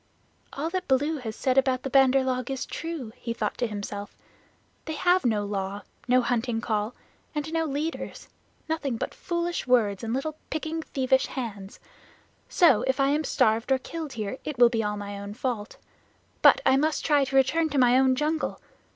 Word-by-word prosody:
"All 310 Hz, +4 st, -3 dB
that 370 Hz, 0 st, -3 dB
Baloo 290 Hz, +4 st, +2 dB
has 220 Hz, -4 st, -5 dB
said 265 Hz, -1 st, +2 dB
about 260 Hz, -1 st, 0 dB
the 270 Hz, -, -3 dB
Bandar 270 Hz, -1 st, +5 dB
log 255 Hz, -1 st, -2 dB
is 270 Hz, -1 st, -3 dB
true," 320 Hz, -9 st, -6 dB
he 230 Hz, -, -4 dB
thought -, -, -2 dB
to 245 Hz, -, +1 dB
himself. 205 Hz, -1 st, -6 dB, 0.7 s
"They 315 Hz, -, -4 dB
have 355 Hz, +4 st, +3 dB
no 210 Hz, -3 st, +1 dB
Law, 200 Hz, 0 st, -3 dB, 0.2 s
no 250 Hz, 0 st, +4 dB
Hunting 235 Hz, -1 st, 0 dB
Call, 215 Hz, 0 st, -2 dB, 0.4 s
and 300 Hz, +2 st, -3 dB
no 325 Hz, 0 st, +1 dB
leaders 305 Hz, +3 st, -4 dB, 0.4 s
nothing 295 Hz, -7 st, -2 dB
but -, -, -4 dB
foolish 345 Hz, -3 st, -3 dB
words 220 Hz, -5 st, +2 dB
and 225 Hz, -, -3 dB
little 295 Hz, +5 st, -2 dB
picking 315 Hz, +1 st, -3 dB
thievish 265 Hz, -3 st, +1 dB
hands. 205 Hz, -6 st, -6 dB, 0.7 s
So 315 Hz, -, +5 dB
if 265 Hz, +1 st, +1 dB
I 275 Hz, 0 st, +3 dB
am 300 Hz, +2 st, +1 dB
starved 230 Hz, -3 st, +1 dB
or 265 Hz, -, +5 dB
killed 310 Hz, +1 st, -6 dB
here, 215 Hz, +2 st, -4 dB
it 300 Hz, -4 st, -5 dB
will 240 Hz, -1 st, +7 dB
be 230 Hz, -2 st, 0 dB
all 210 Hz, 0 st, -2 dB
my 200 Hz, 0 st, -6 dB
own 200 Hz, +1 st, -7 dB
fault. 235 Hz, -4 st, -3 dB, 0.6 s
But -, -, +7 dB
I 265 Hz, -, +5 dB
must 305 Hz, +2 st, 0 dB
try 290 Hz, -2 st, +4 dB
to 270 Hz, 0 st, -3 dB
return 315 Hz, +5 st, +3 dB
to 285 Hz, -, -2 dB
my 250 Hz, -1 st, +5 dB
own 260 Hz, 0 st, +4 dB
jungle. 310 Hz, +3 st, -1 dB
260 Hz, 185 wpm, -26 LUFS, 225-300 Hz, 0.7 s, will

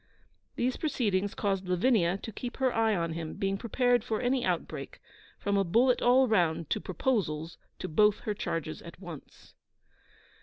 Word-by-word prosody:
These 250 Hz, +1 st, 0 dB
proceedings 205 Hz, -, 0 dB
caused 195 Hz, -2 st, -1 dB
Lavinia 180 Hz, -1 st, +3 dB
to 225 Hz, -, -5 dB
keep 240 Hz, +3 st, -6 dB
her 260 Hz, -2 st, +1 dB
eye 225 Hz, -1 st, +2 dB
on 170 Hz, -2 st, -1 dB
him, 160 Hz, -1 st, -5 dB
being 195 Hz, 0 st, -1 dB
prepared 245 Hz, +2 st, +1 dB
for 225 Hz, -3 st, -2 dB
any 250 Hz, 0 st, +1 dB
outbreak, -, -, -3 dB, 0.4 s
from 200 Hz, 0 st, 0 dB
a 195 Hz, -, +3 dB
bullet 240 Hz, +8 st, +3 dB
all 255 Hz, +2 st, +5 dB
round 170 Hz, -7 st, +1 dB
to -, -, 0 dB
proposals 170 Hz, -6 st, -1 dB, 0.2 s
to -, -, -5 dB
both 210 Hz, +6 st, +3 dB
her 210 Hz, -, -2 dB
charges 165 Hz, -5 st, -4 dB
at 170 Hz, -, -11 dB
once. 175 Hz, -6 st, -11 dB
205 Hz, 160 wpm, -29 LUFS, 170-245 Hz, 0.4 s, all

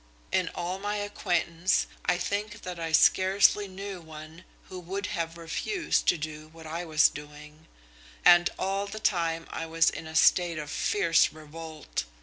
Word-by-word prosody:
In -, -, +1 dB
all 180 Hz, +2 st, -3 dB
my 205 Hz, +1 st, -2 dB
acquaintance 185 Hz, -3 st, 0 dB, 0.2 s
I 175 Hz, -, +2 dB
think 210 Hz, +3 st, -3 dB
that 180 Hz, -2 st, -6 dB
I 165 Hz, -1 st, -3 dB
scarcely 195 Hz, +5 st, +4 dB
knew 195 Hz, -1 st, -7 dB
one 160 Hz, +1 st, -11 dB, 0.2 s
who 185 Hz, -, -8 dB
would 190 Hz, +3 st, -4 dB
have 165 Hz, 0 st, -3 dB
refused 250 Hz, -, -1 dB
to 175 Hz, -, +4 dB
do 155 Hz, 0 st, -6 dB
what 160 Hz, +1 st, -14 dB
I 165 Hz, +3 st, -4 dB
was 155 Hz, -2 st, +5 dB
doing. 150 Hz, +1 st, -11 dB, 0.6 s
And 175 Hz, 0 st, +7 dB
all 195 Hz, +1 st, -1 dB
the 215 Hz, +2 st, -7 dB
time 165 Hz, -5 st, 0 dB
I 165 Hz, -, -4 dB
was 165 Hz, 0 st, +3 dB
in 160 Hz, -, -8 dB
a 160 Hz, -, -9 dB
state 175 Hz, 0 st, +4 dB
of 150 Hz, -2 st, -5 dB
fierce 170 Hz, -2 st, +2 dB
revolt. 155 Hz, 0 st, -7 dB
170 Hz, 160 wpm, -28 LUFS, 160-190 Hz, 0.6 s, And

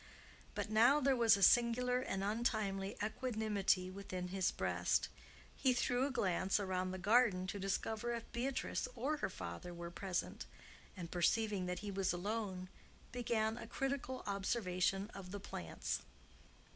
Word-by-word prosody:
But 215 Hz, -, -3 dB
now 240 Hz, +7 st, +6 dB
there 275 Hz, -1 st, +3 dB
was 230 Hz, -4 st, +6 dB
a 195 Hz, -, +1 dB
singular 245 Hz, +3 st, +5 dB
and 195 Hz, -6 st, -2 dB
untimely 205 Hz, -3 st, 0 dB
equanimity 210 Hz, -5 st, 0 dB
within 185 Hz, -2 st, -5 dB
his 190 Hz, 0 st, +1 dB
breast. -, -, 0 dB, 0.5 s
He 260 Hz, -2 st, +3 dB
threw 245 Hz, +2 st, +1 dB
a -, -, -4 dB
glance 190 Hz, -5 st, +1 dB
around 185 Hz, -2 st, -1 dB
the 185 Hz, -, -4 dB
garden 205 Hz, -1 st, +4 dB
to 200 Hz, +2 st, -4 dB
discover 215 Hz, +4 st, -1 dB
if 230 Hz, -, -5 dB
Beatrice 255 Hz, +3 st, -1 dB
or 275 Hz, +6 st, 0 dB
her -, -, -1 dB
father 95 Hz, -, -6 dB
were 170 Hz, 0 st, -6 dB
present, 185 Hz, 0 st, -3 dB, 0.5 s
and, 170 Hz, -2 st, -6 dB
perceiving 195 Hz, +2 st, +1 dB
that 180 Hz, 0 st, -2 dB
he 205 Hz, -, -3 dB
was 195 Hz, -2 st, 0 dB
alone, 190 Hz, 0 st, -3 dB, 0.4 s
began 230 Hz, -2 st, 0 dB
a -, -, -7 dB
critical 270 Hz, -1 st, -2 dB
observation 195 Hz, -1 st, 0 dB
of 190 Hz, -2 st, -8 dB
the 205 Hz, +2 st, -5 dB
plants. 85 Hz, -, -4 dB
205 Hz, 145 wpm, -37 LUFS, 185-240 Hz, 0.5 s, now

